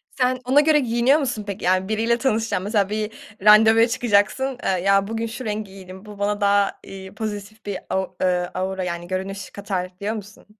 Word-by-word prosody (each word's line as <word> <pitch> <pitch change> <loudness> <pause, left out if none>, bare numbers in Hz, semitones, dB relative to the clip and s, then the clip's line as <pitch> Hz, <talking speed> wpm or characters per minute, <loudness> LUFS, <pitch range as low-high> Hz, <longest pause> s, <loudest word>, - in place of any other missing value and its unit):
Sen 255 0 +1
ona 265 +4 +5
göre 305 0 +4
giyiniyor 245 +3 +3
musun, 245 -7 -2
peki? 200 0 -6
Yani, 185 +1 +2
biriyle 225 +2 +1
tanışacaksın, 225 -6 0
mesela, 205 -1 +1
bir 215 +1 -2 0.3
randevuya 220 +2 +7
çıkacaksın, 240 +3 +1
eee, - - +1
ya, 195 +1 +3
bugün 225 +1 -2
şu 230 +3 -7
rengi 210 -2 -4
giydim, 190 0 -11
bu 210 -1 -11
bana 205 +1 -1
daha, 200 0 +2
iii, 190 0 -10
pozitif 215 0 -6
bir 200 -2 -3
au 190 0 -2
eee, 180 -1 +1
aura, 190 0 -2
yani, 175 -1 -4
görünüş 190 +1 -4
katar 195 -3 -4
diyor 210 +2 -2
musun? 210 -1 -10
210 Hz, 185 wpm, -22 LUFS, 190-225 Hz, 0.3 s, randevuya